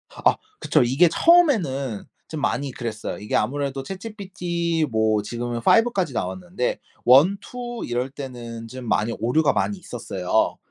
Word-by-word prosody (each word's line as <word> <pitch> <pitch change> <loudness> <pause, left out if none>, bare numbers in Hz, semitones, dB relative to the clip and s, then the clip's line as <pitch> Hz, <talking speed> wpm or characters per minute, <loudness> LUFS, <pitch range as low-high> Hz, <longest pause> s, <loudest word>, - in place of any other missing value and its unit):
아. - - +3 0.2
그쵸. - - +2
이게 135 +9 +4
처음에는 165 - +3 0.2
좀 155 -2 -5
많이 140 0 -1
그랬어요. 115 -3 -5
이게 105 - -3
아무래도 135 +3 -1
ChatGPT 180 -5 -3
뭐 110 -1 +2
지금은 120 +3 -4
5 225 - +4
까지 190 -3 -1
나왔는데 180 -8 -2 0.3
1-2 200 - +3
이럴 125 +2 -2
때는 120 -4 -8
좀 125 +1 -8
많이 110 +1 +1
오류가 140 +6 +2
많이 205 - 0
있었어요. 115 - -1
135 Hz, 310 characters per minute, -23 LUFS, 120-180 Hz, 0.3 s, 이게